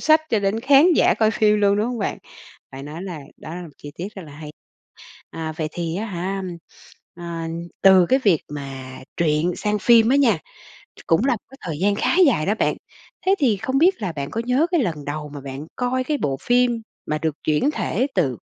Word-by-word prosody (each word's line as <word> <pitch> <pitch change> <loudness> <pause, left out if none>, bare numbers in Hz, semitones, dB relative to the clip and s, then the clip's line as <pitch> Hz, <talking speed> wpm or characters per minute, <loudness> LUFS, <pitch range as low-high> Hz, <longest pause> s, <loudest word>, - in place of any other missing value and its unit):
sách 315 0 +5
cho 220 - +3
đến 200 +2 0
khán 285 +7 +6
giả - - +4
coi 220 -1 +2
phim 210 -1 +3
luôn, 200 0 +3
đúng 210 +2 +1
hông 245 -1 -3
bạn? 200 - -2 0.5
Phải 135 +1 -8
nói 155 +5 -7
là 175 -6 -6 0.2
đó 160 - -9
là 180 - -6
một 170 - -9
chi 145 - -9
tiết 180 +4 -4
rất 195 - -8
là 145 - -12
hay. 150 +1 -9 0.8
À, 160 -1 -5
vậy 155 -1 -2
thì 170 -1 -3
á 220 +3 -3
hả, 190 +1 -3 0.7
ờ, 175 - -9 0.6
từ 190 -2 +7
cái 265 - +4
việc 195 - +2
mà 135 -3 -7 0.2
truyện 160 +1 +1
sang 210 0 -1
phim 230 +1 +5
á 270 - +4
nha, 240 - +3 0.6
ch - - -16
cũng 165 +9 +3
là 275 - +3
một 215 - -11
cái 270 - -13
thời 160 -4 -4
gian 200 +2 +2
khá 210 - 0
dài 210 - +2
đó 205 - +2
bạn. - - +1 0.5
Thế 385 - +5
thì 240 -8 +2
không 260 +7 -1
biết 355 - +3
là 180 -4 -2
bạn 140 -1 -5
có 230 - -2
nhớ 260 +6 +3
cái 345 - +3
lần 160 -9 -3
đầu 150 +1 -5
mà 140 - -6
bạn 135 +2 -7
coi 255 +1 -1
cái 295 +1 -1
bộ 135 -2 -1
phim 245 -1 +2 0.2
mà 155 0 -1
được 155 -1 -2
chuyển 155 - +2
thể 265 -3 -1
từ 135 - 0
195 Hz, 225 wpm, -22 LUFS, 155-240 Hz, 0.8 s, từ